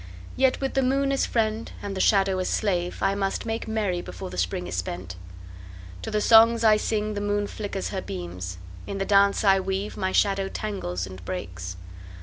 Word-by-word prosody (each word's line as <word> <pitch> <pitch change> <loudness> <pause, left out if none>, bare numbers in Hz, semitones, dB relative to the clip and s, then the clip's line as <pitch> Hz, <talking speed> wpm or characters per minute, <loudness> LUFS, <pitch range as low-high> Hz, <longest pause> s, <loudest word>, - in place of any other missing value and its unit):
Yet 265 0 +3
with 270 -1 -2
the 270 - +2
moon 275 +2 +2
as 275 - +1
friend 220 -1 -1
and 200 -1 -5
the 190 - -1
shadow 195 -2 +3
as 185 - -1
slave 180 -4 -1
I 195 0 +3
must 195 +1 -2
make 225 0 -3
merry 210 -5 -1
before 90 - -7
the 90 - -7
Spring 90 0 -1
is 90 - -6
spent. 90 0 -4 0.9
To - - -5
the 210 - 0
songs 230 +1 +6
I 215 -1 +7
sing 215 0 -1
the 205 - -3
moon 205 0 0
flickers 205 -2 -4
her 190 - -3
beams; 90 - -6 0.3
In 200 - -4
the 195 - -1
dance 200 0 +4
I 195 -2 +5
weave 190 +2 -3
my 190 0 -1
shadow 195 -1 +2
tangles 90 - -3
and 95 -1 -10
breaks. 90 -1 -5
195 Hz, 195 wpm, -25 LUFS, -, 0.9 s, I